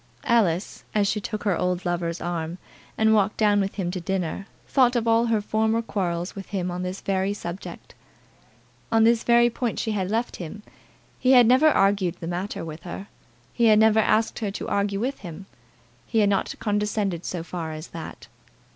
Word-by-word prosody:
Alice, 200 -7 +1
as 205 -1 +3
she 210 +1 -1
took 215 +1 -5
her 200 -4 +2
old 180 +1 -1
lover's 175 -1 -2
arm, 170 -1 -3 0.4
and 220 0 +4
walked 210 -1 +2
down 205 -2 +3
with 195 0 -3
him 180 -4 -2
to 185 -1 -4
dinner, 190 +2 -3 0.2
thought 255 -2 +3
of 235 -1 0
all 230 +1 +3
her 225 -2 +1
former 220 +2 +1
quarrels 180 -6 -2
with 195 -1 -8
him 180 -3 -2
on 180 +1 -4
this 185 +1 -4
very 195 +1 0
subject. 175 -1 -8 1.0
On 225 0 +4
this 230 0 +4
very 235 0 +5
point 240 -1 -2
she 220 - -1
had 190 -3 -1
left 230 +3 -1
him. 190 +5 -8 0.6
He 255 +1 +4
had 245 -2 +8
never 255 +6 +5
argued 195 - +2
the - - -6
matter 175 +2 -4
with 155 0 -8
her. 195 +3 -8 0.4
He 235 - +2
had 215 -1 +6
never 220 0 +5
asked 220 +1 +2
her 215 -3 -2
to 195 - -5
argue 200 0 0
with 260 +5 -2
him. 180 +1 -9 0.6
He - - -2
had 210 -2 +4
not 195 -1 0
condescended 205 -4 -1
so 175 -3 -4
far 165 -2 -5
as 155 +1 -8
that. 165 -8 -9
200 Hz, 190 wpm, -24 LUFS, 180-220 Hz, 1.0 s, had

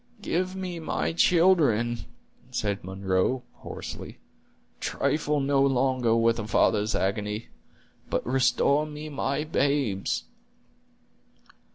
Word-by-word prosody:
"Give 185 +2 -1
me 185 -3 -4
my 160 - -2
children," 155 - +3 0.4
said 105 -5 -2
Munro, 95 +6 0
hoarsely; - - -8 0.6
"trifle 150 -1 0
no 140 0 +2
longer 130 -3 +2
with 115 0 +3
a 110 - -4
father's 105 +1 +2
agony, 105 +2 -2 0.6
but - - -1
restore 135 +3 +2
me 150 0 -7
my 140 0 -1
babes." 140 -9 0
130 Hz, 95 wpm, -27 LUFS, 110-150 Hz, 0.6 s, children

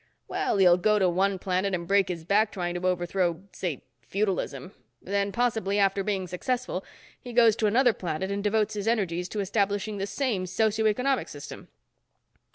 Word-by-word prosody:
"Well, - - -1
he'll 180 -2 +6
go 210 +4 +3
to 190 -2 +3
one 190 +2 +1
planet 185 +1 0
and 170 -1 -5
break 200 0 +3
his 170 -3 -4
back 210 +4 +3
trying 175 -3 -3
to 175 +1 -2
overthrow, 175 -1 0
say, 170 -9 -4 0.2
feudalism. 195 -2 -2 0.3
Then, 200 +1 -1
possibly 220 -4 0
after 195 -1 +2
being 195 -2 -1
successful, 190 +3 -3 0.4
he 245 - -9
goes 230 -2 +5
to 215 - +2
another 245 +3 +4
planet 185 +1 -3
and 200 0 -2
devotes 215 0 +1
his 205 0 -4
energies 180 -6 0
to 210 - -2
establishing 205 +1 -1
the 195 - -2
same 200 -3 -1
socio 220 +3 +1
economic 255 +5 +1
system." 145 -1 -9
200 Hz, 170 wpm, -27 LUFS, 185-215 Hz, 0.4 s, he'll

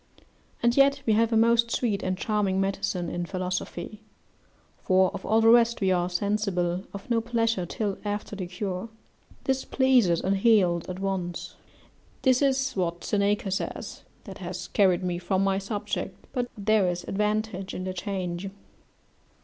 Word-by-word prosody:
And 235 0 +3
yet 275 0 +4
we 220 - +3
have 225 +2 +3
a 225 - +3
most 235 +1 +4
sweet 225 -4 0
and 185 0 -1
charming 200 -2 0
medicine 195 -2 -1
in 175 +1 -3
philosophy; 185 +2 -4 0.8
for 185 -1 +3
of - - -6
all 220 +2 +4
the 225 - +6
rest 235 0 +5
we 190 -2 +2
are 180 -1 +1
sensible 185 -2 -1
of 200 0 -9
no 230 -1 +3
pleasure 230 -5 0
till 200 +1 -3
after 205 0 -3
the 185 -3 -4
cure: 185 +3 -4 0.5
this 265 0 0
pleases 250 -11 +3
and 195 +1 0
heals 190 -6 +3
at 185 - -4
once." 190 -3 -3 0.7
This 255 -1 +4
is 265 -1 +2
what 175 -2 -2
Seneca 200 -1 0
says, 190 - -4 0.2
that 195 -1 -10
has 180 -1 -6
carried 185 -3 +3
me 175 -1 -1
from 185 +2 0
my 195 0 +1
subject, 200 +1 -4 0.2
but 245 -2 -1
there 210 -1 +3
is 175 0 -3
advantage 210 -1 -2
in 185 - -4
the 185 0 -3
change. 185 -1 -4
195 Hz, 160 wpm, -27 LUFS, 185-225 Hz, 0.8 s, the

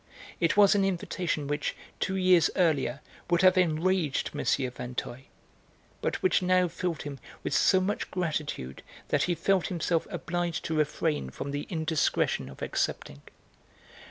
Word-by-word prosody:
It 170 +2 +1
was 205 -1 +7
an 200 -1 +2
invitation 180 -4 -1
which, 145 +1 -2 0.2
two 190 - -1
years 185 -3 +4
earlier, 145 -6 +1 0.3
would 175 +1 +3
have 185 0 +7
enraged 175 -2 +1
M. 145 - -3
Vinteuil, 125 -1 -2 0.8
but - - -2
which 375 - +3
now 185 0 +3
filled 170 -1 -3
him 140 -2 -7 0.2
with - - -2
so 190 +7 +4
much 190 +3 -2
gratitude 150 - -3 0.3
that - - +2
he 175 - 0
felt 185 +2 +1
himself 170 -2 -1
obliged 175 -1 -3
to 160 - -1
refrain 150 - 0
from 140 - -6
the 145 +1 -4
indiscretion 160 - 0
of 65 - -9
accepting. 70 +1 -2
165 Hz, 145 wpm, -28 LUFS, 145-185 Hz, 0.8 s, was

